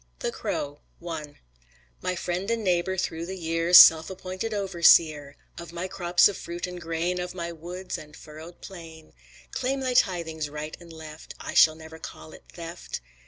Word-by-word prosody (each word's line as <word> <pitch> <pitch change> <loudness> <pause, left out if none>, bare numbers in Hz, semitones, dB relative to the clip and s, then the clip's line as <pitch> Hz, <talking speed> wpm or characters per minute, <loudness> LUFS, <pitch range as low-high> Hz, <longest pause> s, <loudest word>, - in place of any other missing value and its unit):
THE - - -1
CROW 145 0 -4 0.3
I 155 -3 -6 0.7
My 180 - -1
friend 180 +3 -3
and 230 -1 -1
neighbor 185 0 +1
through 165 -2 -3
the 190 +1 -6
year, 165 0 -1
Self 160 -2 +9
appointed 185 +3 -5
overseer 170 -7 +3 0.2
Of 170 -1 -9
my 175 +2 -4
crops 175 -2 +4
of 205 - -4
fruit 175 +1 -5
and 180 -1 -8
grain, 170 +2 -2
Of 180 0 -5
my 170 -1 -4
woods 175 +3 -6
and 150 0 -13
furrowed 160 +3 -12
plain, 165 -4 -11 0.4
Claim 265 +2 -1
thy 255 -1 -1
tithings 165 -9 +1
right 150 +1 -6
and 170 -1 -13
left, 160 -1 -10
I - - -6
shall 155 -1 +6
never 160 0 -12
call 160 - -10
it - - -15
theft. 170 - -7
170 Hz, 170 wpm, -26 LUFS, 160-185 Hz, 0.7 s, Self